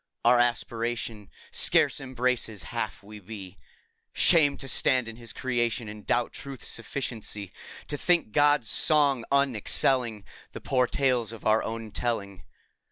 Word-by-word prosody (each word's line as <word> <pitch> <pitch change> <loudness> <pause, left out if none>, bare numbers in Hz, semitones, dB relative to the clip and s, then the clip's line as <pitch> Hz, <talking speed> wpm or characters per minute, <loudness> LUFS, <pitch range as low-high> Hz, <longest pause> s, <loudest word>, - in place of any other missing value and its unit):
Our 120 +1 +6
aspiration 115 -3 -1 0.2
Scarce - - +3
embraces 125 -6 -1
half - - -3
we 105 +1 -11
be. 95 -2 -10 0.5
Shame! 150 -5 +4
to 135 - -8
stand 130 -2 +2
in 115 - -7
His 115 -2 -7
creation 120 -1 -1
And 105 -1 -10
doubt 120 0 +1
Truth's 135 -3 -8
sufficiency! 115 -5 -5 0.3
To 145 - -4
think 175 -11 +2
God's 145 -2 +3
song 140 -2 +3
unexcelling 125 -3 +1 0.3
The - - -8
poor 125 -2 +1
tales 125 -5 0
of 115 - -11
our 110 +1 +4
own 115 -1 -5
telling. 100 -5 -3
120 Hz, 135 wpm, -27 LUFS, 110-130 Hz, 0.5 s, Our